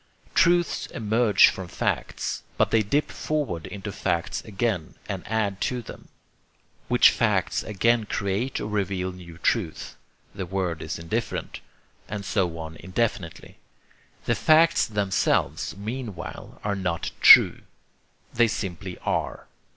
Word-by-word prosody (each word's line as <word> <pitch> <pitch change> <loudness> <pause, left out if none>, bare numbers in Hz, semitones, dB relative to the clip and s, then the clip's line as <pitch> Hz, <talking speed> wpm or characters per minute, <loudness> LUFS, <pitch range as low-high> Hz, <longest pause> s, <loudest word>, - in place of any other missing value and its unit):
Truths 175 0 +3
emerge 110 -1 +4
from 95 -2 -6
facts; - - -2 0.2
but - - +2
they 110 - +4
dip 140 +9 0
forward 140 - -3
into 100 0 -6
facts 85 -3 -2
again 100 -5 -2
and 95 -2 -4
add 105 -3 -1
to 125 -2 -1
them; - - -11 0.8
which - - +6
facts - - +1
again 115 +2 +1
create 100 +7 -2
or - - -4
reveal 95 -3 -2
new 85 -2 -12
truth 95 -3 -1 0.4
(the 95 -2 -5
word 90 -3 -2
is - - -4
indifferent) 85 0 -4 0.5
and 105 -1 -5
so 90 -5 0
on 80 0 -7
indefinitely. 95 -2 -3 0.7
The 120 - +2
'facts' 165 +5 +4
themselves 100 -2 0
meanwhile 110 -3 -7
are 100 0 -1
not 90 -4 -2
TRUE. - - +8 0.7
They 120 0 +4
simply 95 -3 -5
ARE. - - -2
100 Hz, 125 wpm, -25 LUFS, 90-115 Hz, 0.8 s, TRUE